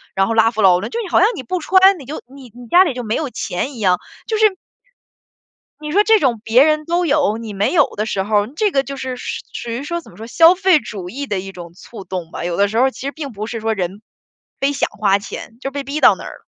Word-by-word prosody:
然 195 - +3
后 230 - -1
拉 225 0 +4
夫 220 - -2
劳 180 -2 +6
伦， 195 - -5
就 465 - -4
你 405 - -6
好 - - +3
像 390 - +5
你 - - -6
不 365 +9 -3
穿， 380 +2 +4
你 275 - -11
就 295 +5 -7
你 270 -3 -12
你 245 0 -11
家 355 +10 +6
里 305 - -1
就 250 - -4
没 220 0 -2
有 300 - -2
钱 245 +3 -4
一 - - -9
样， 185 -4 +2 0.3
就 440 - -1
是 430 -3 +3 1.2
你 300 0 -6
说 405 +4 +5
这 445 0 +5
种 240 -5 +1
别 235 +4 +5
人 305 0 +1
都 345 +1 +1
有， 285 -8 +2
你 225 -2 -7
没 200 +1 0
有 295 -5 +5
的 215 +1 -1
时 195 -3 -1
候， 205 0 +1
这 315 - -1
个 270 -6 +1
就 275 0 -7
是 260 -1 -5
说 - - -7 0.2
属 235 - -6
于 235 +3 -3
说 340 +3 -3
怎 - - -17
么 - - -18
说， 220 - -9
消 330 +9 +6
费 370 -4 +3
主 195 -5 -7
义 280 +6 -5
的 205 -6 -2
一 195 +1 -7
种 170 -2 -10
促 210 +3 -11
动 180 -2 -6
吧？ - - -6
有 175 -1 -2
的 200 - +3
时 215 +3 -2
候 250 - +5
儿 265 - +3
其 - - -13
实 280 +1 -3
并 290 -3 -6
不 210 0 -5
是 230 0 -5
说 220 0 -1
人 190 0 -4 0.6
非 275 +1 +1
想 275 - -1
花 200 -2 +1
钱， 225 +2 -9
就 270 - -4
被 280 0 -5
逼 285 +3 -4
到 - - +7
那 - - -10
儿 - - -7
了。 - - -30
245 Hz, 310 characters per minute, -18 LUFS, 210-305 Hz, 1.2 s, 到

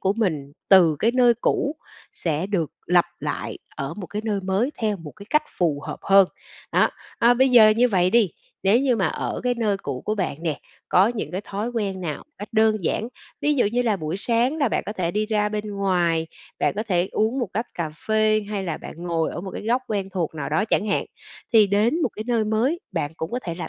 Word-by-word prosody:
của 190 - +2
mình 155 -11 -1 0.2
từ 175 -6 +6
cái 225 - +3
nơi 245 -2 +5
cũ 290 +5 0 0.4
sẽ 160 +1 -2
được 185 -7 -1 0.2
lặp 175 0 +4
lại - - -4 0.2
ở 135 0 -4
một 190 -4 -6
cái 210 +1 -5
nơi 210 -3 -1
mới 195 +8 0
theo 215 -3 0
một 165 -5 -9
cái 200 -1 -12
cách 300 0 +4 0.2
phù 160 -5 +1
hợp - - -5
hơn. 195 -1 +6 0.5
Đó, - - +4 0.3
à, 240 +1 +5
bây 265 +2 +4
giờ 230 -3 +8
như 250 +2 +4
vậy 185 -4 +2
đi, 220 -4 +4 0.3
nếu 195 +5 +4
như 265 -3 +2
mà 195 -5 +1
ở - - -3
cái 250 0 +2
nơi 210 -4 +1
cũ 140 -9 -5
của 215 - 0
bạn 185 -8 -2
nè, 155 -5 -1 0.3
có 190 +4 +5
những 235 -2 -4
cái 185 - -3
thói 205 +2 -4
quen 200 -5 -2
nào 160 -5 -4
cách 205 - -7
đơn 220 -4 +3
giản, 225 - -1 0.3
ví 295 0 +2
dụ 260 - +3
như 240 +4 +1
là 220 -4 +1
buổi 160 0 -3
sáng 240 +7 +1
là 280 -5 +2
bạn - - 0
có 210 - -3
thể 175 -5 -1
đi 210 +3 -1
ra 210 -1 +1
bên 210 0 -3
ngoài, 175 -4 +1 0.3
bạn - - +1
có 215 - 0
thể 180 -1 +1
uống 220 +5 +1
một 240 -5 -1
tách 225 +4 -2
cà 165 -3 -3 0.2
phê 215 0 +3
hay 200 -2 -2
là 165 -4 -2
bạn - - -9
ngồi 170 -2 0
ở - - -5
một 190 +1 -6
cái - - -6
góc 240 +4 +1
quen 200 -3 -2
thuộc 175 -4 -2
nào 150 -3 -4
đó 205 - +1
chẳng 215 -1 +1
hạn, 200 - +1 0.5
thì 220 -3 +7
đến 215 - +2
một - - +2
cái 215 - -6
nơi 235 -3 +1
mới, 235 +10 +1
bạn 155 -5 -1
cũng 160 - -4
có 245 - -1
thể 170 - -4
là 175 - -5
205 Hz, 240 wpm, -23 LUFS, 180-230 Hz, 0.5 s, giờ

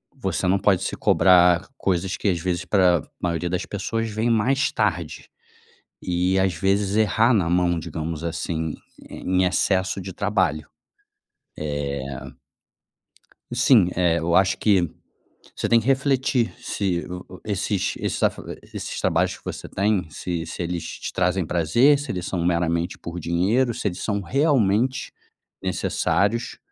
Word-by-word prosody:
você 95 - -2
não 95 +2 +3
pode 95 -2 +2
se - - -2
cobrar 90 0 +4
coisas 95 -2 -1
que - - -3
às 90 -3 0
vezes 85 0 -2
pra 90 -5 +3 0.2
maioria 85 0 -1
das 90 +1 -2
pessoas 115 +3 -3
vem 110 +2 -1
mais 125 +5 +2
tarde - - -2 0.7
e, 90 +1 0
às 95 -2 +2
vezes, 95 +3 +1
errar 110 +2 +3
na 95 -6 +2
mão, 90 -1 +2
digamos 80 -1 -5
assim, 80 -1 -3 0.3
em 95 0 0
excesso 95 +1 +1
de 95 0 -7
trabalho, 95 -7 0 0.9
eh 75 -2 -3 1.5
Sim, 120 -6 +5
é. 85 -2 +2
Eu 85 +1 0
acho 95 0 +3
que 95 -6 +2 0.7
você - - -2
tem 115 -1 +5
que 115 - -8
refletir 135 -3 +1
se 90 -4 -2
o 90 0 -7
o - - -19
esses 100 -1 -1
esses - - -3
afa - - +1 0.2
esses - - -6
trabalhos - - +1
que - - -22
você - - -6
tem, 100 -3 0
se 85 +1 -4
se 80 +2 -5
eles 85 -1 -3
te - - -6
trazem 90 0 +1
prazer, 90 - +3
se 145 - -6
eles 90 -2 -4
são 90 -3 -2
meramente 85 0 0
por 85 +1 -7
dinheiro, 100 +9 +1
se - - -1
eles 90 -1 -6
são 100 -2 -1
realmente 130 - +1 0.5
necessários 115 +4 0
95 Hz, 150 wpm, -23 LUFS, 85-105 Hz, 1.5 s, Sim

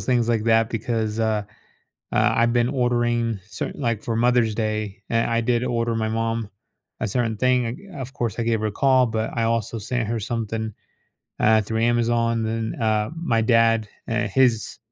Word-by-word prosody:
things 120 -3 +1
like 115 -2 +1
that 115 -1 +3
because, 115 -1 -2
uh, 110 -2 +1 0.7
ah, - - +3
I've 115 0 +3
been 120 0 +2
ordering 120 -3 0
certain 105 - -5
like, 115 -5 -1
for 115 - -2
Mother's 120 -2 +3
Day, 110 -2 -3
eh, 115 0 +2
I 115 0 +1
did 120 +1 +1
order 115 -2 0
my 110 -1 -1
mom 115 -1 -2 0.5
a - - 0
certain 115 +1 -1
thing, 125 - 0
o - - -8
of 130 +1 -6
course, 120 -6 -3
I - - +1
gave 115 -1 +1
her 110 - 0
a 105 - -2
call, 130 +2 +4
but 110 0 -2
I 115 - 0
also 115 0 -1
sent 115 +1 -2
her 115 0 -1
something, 110 0 -3 0.7
ah, 110 0 +5
through 110 +2 -2
Amazon, 115 0 +2
then, 110 0 -2
ah, 110 -1 +1
my 120 -9 +1
dad, 115 -1 +3 0.2
eh, 120 +1 0
his 115 0 +1
115 Hz, 185 wpm, -23 LUFS, 110-120 Hz, 0.7 s, ah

